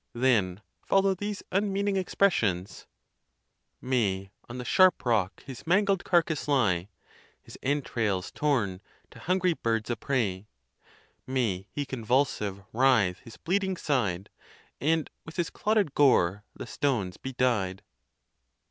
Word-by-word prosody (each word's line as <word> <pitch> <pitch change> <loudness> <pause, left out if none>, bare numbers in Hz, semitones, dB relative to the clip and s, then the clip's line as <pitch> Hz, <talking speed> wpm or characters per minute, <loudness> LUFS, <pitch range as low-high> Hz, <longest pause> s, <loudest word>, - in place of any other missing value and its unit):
Then 110 -6 +1 0.2
follow 195 0 +3
these 205 +2 -5
un 200 +1 +1
meaning 200 0 0
expressions: 120 - 0 0.9
May 100 -7 -1 0.2
_On 120 - -6
the 125 - -6
sharp 185 -1 +4
rock 100 -6 0
his 135 +2 -10
mangled 195 +1 +2
carcass 165 -4 +1
lie, 100 -10 +1 0.5
His - - -14
entrails 115 -9 -1
torn, 110 -11 0 0.3
to - - -13
hungry 185 0 +1
birds 115 -5 -1
a - - 0
prey! 105 -6 -2 0.8
May 110 -8 -1
he 145 - -4
convulsive 115 -6 -1
writhe 115 -8 +3
his 115 +4 -13
bleeding 190 +1 -1
side, 105 - -1 0.5
And 160 +1 +1 0.2
with 160 - -11
his 175 -2 -1
clotted 210 -8 +1
gore 105 -8 +3
the - - -7
stones 105 -11 -1
be 130 - -7
dyed! 110 -7 0
125 Hz, 125 wpm, -28 LUFS, 100-165 Hz, 0.9 s, sharp